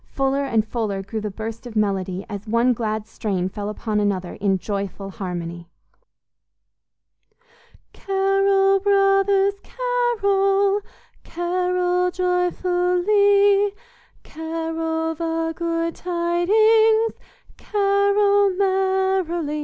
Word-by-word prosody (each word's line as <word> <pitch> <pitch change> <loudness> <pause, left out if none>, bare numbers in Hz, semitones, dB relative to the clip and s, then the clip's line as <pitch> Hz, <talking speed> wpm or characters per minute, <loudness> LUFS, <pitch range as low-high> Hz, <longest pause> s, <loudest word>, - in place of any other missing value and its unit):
Fuller 270 +1 0
and 225 -5 +1
fuller 210 -5 -3
grew 215 +3 -5
the 210 - -3
burst 220 +4 -7
of 230 - -10
melody 195 -3 -1
as 205 0 -7
one 235 +3 +2
glad 220 -2 -3
strain 195 -4 -3
fell 205 +2 -5
upon 215 0 -2
another 195 -3 -1
in 195 -1 0
joyful 195 0 -5
harmony: 175 -4 -6 2.3
"Carol, 390 0 +2
brothers, 390 0 +3
carol, 405 -5 +1 0.4
Carol 360 +1 0
joyfully, 365 +3 +2 0.5
Carol 325 0 -3
the 325 0 -2
good 335 0 -2
tidings, 435 +6 +2 0.4
Carol 405 0 +2
merrily! 380 -5 0
345 Hz, 90 wpm, -22 LUFS, -, 2.3 s, brothers